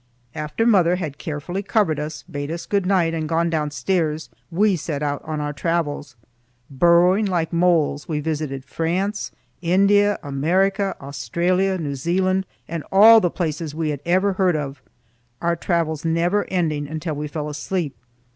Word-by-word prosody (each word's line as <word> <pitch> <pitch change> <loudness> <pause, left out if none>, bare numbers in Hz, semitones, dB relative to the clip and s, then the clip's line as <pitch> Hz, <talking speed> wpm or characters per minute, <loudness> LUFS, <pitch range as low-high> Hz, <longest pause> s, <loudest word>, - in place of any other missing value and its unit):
After 150 +9 -2
mother 180 -6 +4
had 155 -6 -5
carefully 170 +4 -4
covered 200 -7 +1
us, 150 0 -5
bade 145 0 -6
us 170 +1 -5
good 200 -3 0
night 180 -4 +2
and 160 -2 -3
gone 165 0 +1
downstairs, 155 +1 -1 0.2
we 195 +3 +2
set 150 -3 -4
out 145 -1 -1
on 155 -1 -4
our 145 0 -3
travels. 150 -3 -2 0.6
Burrowing 175 +8 +4
like 175 -3 -1
moles, 165 -4 +2
we 155 -2 -1
visited 150 -3 -3
France, 185 +8 -2 0.3
India, 200 +4 +3
America, 190 +8 +1
Australia, 170 - 0
New 150 -5 -3
Zealand, 185 +6 0 0.2
and 165 -2 -4
all 220 +4 +8
the 175 - +2
places 160 -3 -3
we 160 -1 -1
had 145 - -4
ever 190 +3 +2
heard 185 -2 +2
of; 140 -3 -4 0.6
our 170 0 +1
travels 165 -3 -1
never 170 +5 +1
ending 155 -5 -1
until 155 +1 -4
we 150 +1 -4
fell 150 0 -4
asleep. 150 0 -3
165 Hz, 155 wpm, -22 LUFS, 150-185 Hz, 0.6 s, all